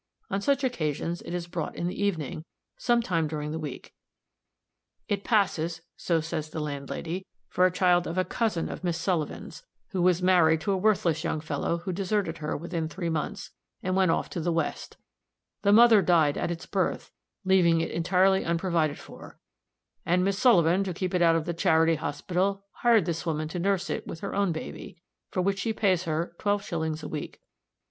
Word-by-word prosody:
On 195 Hz, +1 st, 0 dB
such 275 Hz, +4 st, +1 dB
occasions 170 Hz, -, -2 dB
it -, -, -8 dB
is 175 Hz, -1 st, -3 dB
brought 170 Hz, -2 st, -4 dB
in 170 Hz, -, -3 dB
the 180 Hz, +3 st, -2 dB
evening, 160 Hz, -6 st, -2 dB, 0.3 s
some 240 Hz, -1 st, +1 dB
time 165 Hz, -6 st, 0 dB
during 150 Hz, -1 st, -4 dB
the 160 Hz, -, -3 dB
week. 150 Hz, -4 st, -7 dB, 1.1 s
It 200 Hz, -1 st, -1 dB
passes, 170 Hz, -6 st, +1 dB
so 165 Hz, -2 st, 0 dB
says 155 Hz, -1 st, -4 dB
the 160 Hz, -, -5 dB
landlady, 150 Hz, +5 st, -4 dB, 0.2 s
for 185 Hz, 0 st, +3 dB
the 180 Hz, -, -12 dB
child 180 Hz, -1 st, +3 dB
of 165 Hz, -, -4 dB
a 185 Hz, -, +2 dB
cousin 220 Hz, -8 st, -1 dB
of -, -, -7 dB
Miss 175 Hz, -2 st, 0 dB
Sullivan's, 170 Hz, -3 st, -3 dB, 0.3 s
who 190 Hz, -4 st, -2 dB
was 180 Hz, 0 st, +3 dB
married 170 Hz, -3 st, +5 dB
to 200 Hz, -, -1 dB
a -, -, +2 dB
worthless 185 Hz, -5 st, +1 dB
young 160 Hz, -2 st, -1 dB
fellow, 160 Hz, +2 st, -2 dB
who 185 Hz, -, -2 dB
deserted 190 Hz, -2 st, -1 dB
her 150 Hz, -1 st, -2 dB
within 165 Hz, 0 st, -3 dB
three 170 Hz, +2 st, -4 dB
months, 160 Hz, -2 st, -3 dB, 0.3 s
and 185 Hz, 0 st, 0 dB
went 190 Hz, -2 st, +3 dB
off -, -, +1 dB
to -, -, -3 dB
the 170 Hz, +1 st, 0 dB
west; 165 Hz, 0 st, -3 dB, 0.6 s
the 200 Hz, -, +3 dB
mother 225 Hz, -1 st, +7 dB
died 160 Hz, -6 st, +3 dB
at -, -, -2 dB
its 170 Hz, -1 st, -5 dB
birth, -, -, -2 dB, 0.3 s
leaving 180 Hz, -3 st, +4 dB
it 165 Hz, -, -2 dB
entirely 190 Hz, +3 st, +3 dB
unprovided 165 Hz, -3 st, 0 dB
for, -, -, -12 dB, 0.7 s
and 180 Hz, +2 st, +2 dB
Miss 195 Hz, 0 st, 0 dB
Sullivan, 185 Hz, -6 st, +4 dB
to 185 Hz, -3 st, -4 dB
keep 185 Hz, +1 st, -3 dB
it 180 Hz, -, +1 dB
out 165 Hz, -1 st, +5 dB
of 165 Hz, -1 st, 0 dB
the 170 Hz, -, -2 dB
charity 165 Hz, -2 st, +3 dB
hospital, 185 Hz, +6 st, -2 dB
hired 230 Hz, -6 st, +3 dB
this 165 Hz, -1 st, -2 dB
woman 155 Hz, -2 st, -2 dB
to 175 Hz, -, -4 dB
nurse 195 Hz, +1 st, 0 dB
it -, -, -4 dB
with 165 Hz, -, -7 dB
her 200 Hz, -, -4 dB
own 200 Hz, -2 st, +1 dB
baby, 160 Hz, 0 st, -7 dB, 0.3 s
for 185 Hz, -, -1 dB
which 195 Hz, +1 st, 0 dB
she 225 Hz, +2 st, -1 dB
pays 190 Hz, -4 st, +1 dB
her 165 Hz, +1 st, -2 dB
twelve 205 Hz, -1 st, 0 dB
shillings 160 Hz, -3 st, -3 dB
a -, -, -4 dB
week. 150 Hz, -, -6 dB
175 Hz, 195 wpm, -27 LUFS, 160-190 Hz, 1.1 s, mother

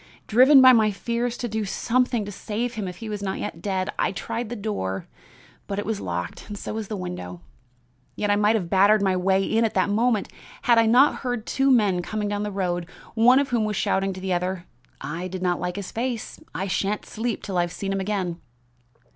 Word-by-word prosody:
Driven 260 Hz, +4 st, +7 dB
by 255 Hz, 0 st, +9 dB
my 220 Hz, -3 st, +4 dB
fears 235 Hz, +4 st, -2 dB
to 240 Hz, -, -3 dB
do 220 Hz, -1 st, -2 dB
something 240 Hz, +2 st, 0 dB
to 205 Hz, -, -6 dB
save 225 Hz, +5 st, -3 dB
him 215 Hz, -5 st, -4 dB
if 180 Hz, -, -6 dB
he 225 Hz, -, -7 dB
was 210 Hz, -1 st, -4 dB
not 190 Hz, -1 st, -2 dB
yet 165 Hz, -5 st, -5 dB
dead, 190 Hz, -1 st, -1 dB
I -, -, +2 dB
tried 230 Hz, +4 st, -4 dB
the 240 Hz, -, -4 dB
door, 200 Hz, -, -3 dB, 0.6 s
but 200 Hz, -, -3 dB
it 205 Hz, -, -2 dB
was 220 Hz, -2 st, -2 dB
locked; 90 Hz, -, -5 dB
so -, -, -5 dB
was 220 Hz, -2 st, -4 dB
the 210 Hz, -, -4 dB
window. 90 Hz, -, -6 dB, 0.7 s
Yet 205 Hz, -1 st, 0 dB
I -, -, +4 dB
might 210 Hz, +2 st, +3 dB
have 190 Hz, -6 st, -1 dB
battered 200 Hz, +3 st, +4 dB
my 190 Hz, -1 st, +2 dB
way 190 Hz, +1 st, +2 dB
in 225 Hz, +3 st, +1 dB
at 225 Hz, -, 0 dB
that 200 Hz, -, +2 dB
moment 225 Hz, 0 st, +1 dB, 0.4 s
had 235 Hz, -1 st, +5 dB
I 225 Hz, -, +4 dB
not 250 Hz, +6 st, +5 dB
heard 245 Hz, -4 st, -3 dB
two 270 Hz, 0 st, +1 dB
men 205 Hz, -8 st, +3 dB
coming 210 Hz, +3 st, -3 dB
down 205 Hz, 0 st, -2 dB
the 210 Hz, -, -2 dB
road, 175 Hz, -3 st, -2 dB, 0.3 s
one 240 Hz, +3 st, +5 dB
of 280 Hz, 0 st, +2 dB
whom 235 Hz, -3 st, +1 dB
was 210 Hz, -1 st, -1 dB
shouting 195 Hz, 0 st, +1 dB
to 185 Hz, -, -8 dB
the 190 Hz, 0 st, -2 dB
other: 180 Hz, 0 st, -2 dB, 0.4 s
'I 165 Hz, +6 st, -4 dB
did 185 Hz, 0 st, -6 dB
not 180 Hz, -1 st, +1 dB
like 180 Hz, 0 st, -3 dB
his 200 Hz, -2 st, -6 dB
face. 235 Hz, -1 st, -4 dB, 0.2 s
I 190 Hz, -, -2 dB
shan't 195 Hz, +2 st, -1 dB
sleep 230 Hz, +1 st, -3 dB
till 190 Hz, -3 st, -2 dB
I've 175 Hz, 0 st, 0 dB
seen 195 Hz, +2 st, -3 dB
him 195 Hz, -, -1 dB
again. 190 Hz, -4 st, -2 dB
205 Hz, 220 wpm, -24 LUFS, 185-225 Hz, 0.7 s, by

